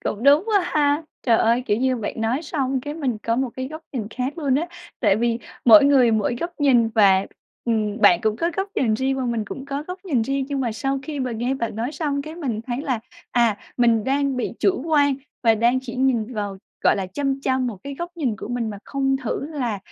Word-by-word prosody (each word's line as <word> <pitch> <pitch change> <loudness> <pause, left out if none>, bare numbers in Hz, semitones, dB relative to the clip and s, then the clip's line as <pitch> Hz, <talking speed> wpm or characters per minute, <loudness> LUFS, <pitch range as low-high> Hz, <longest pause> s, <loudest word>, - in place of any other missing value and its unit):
Cũng 210 - -2
đúng 285 +4 +6
quá 420 -3 +3
ha. 295 -3 +1 0.2
Trời 230 -3 +4
ơi! 235 +2 +3
Kiểu 205 - +2
như 260 +2 +1
bạn 220 -3 -4
nói 235 +7 0
xong 270 -4 -1
cái 290 +3 -6
mình 265 -8 -2
có 230 +2 -1
một 260 -1 0
cái 260 0 -4
góc 315 +2 -8
nhìn 235 -6 -3
khác 260 +7 -3
luôn 280 -5 +1
á. 325 +6 0 0.3
Tại 205 -5 +4
vì 235 +1 0 0.3
mỗi 275 +5 +9
người 270 -4 +5
mỗi 220 +2 +1
góc 340 - -2
nhìn, 245 -5 +4
và, 200 -4 +4 0.4
ừm, 215 -3 0
bạn 175 - +6
cũng 215 0 +1
có 335 +6 0
góc 385 +1 -1
nhìn 225 -4 +2
riêng 265 +4 0
và 260 - -2
mình 235 -3 -1
cũng 265 +6 -7
có 280 +1 -4
góc 365 +1 -5
nhìn 275 -11 +1
riêng. 275 +3 -1
Nhưng 280 -2 -2
mà 240 -4 -1
sau 270 +6 -1
khi 290 0 -5
mà 255 -2 -2
nghe 240 +4 -1
bạn 230 -5 -3
nói 235 +5 -2
xong 290 -3 -2
cái 310 +2 -8
mình 260 -11 -3
thấy 245 0 -2
là, 255 -6 -1 0.3
à, 235 -4 +3 0.2
mình 235 -3 +3
đang 275 0 +1
bị 250 - -2
chủ 375 -9 +2
quan 285 -3 +3 0.3
và 225 -2 +5
đang 235 +4 +2
chỉ 255 -2 -8
nhìn 250 -3 +1
vào, 205 -2 -3 0.3
gọi - - +5
là, 195 -2 -2
chăm 275 +8 -2
chăm 260 -1 0
một 230 -4 -4
cái 280 0 -5
góc 345 +5 -5
nhìn 255 -10 -1
của - - -7
mình 240 -2 -2
mà 205 - -7
không 270 -1 0
thử 260 +1 -3
là 255 -9 -3
255 Hz, 245 wpm, -22 LUFS, 230-280 Hz, 0.4 s, mỗi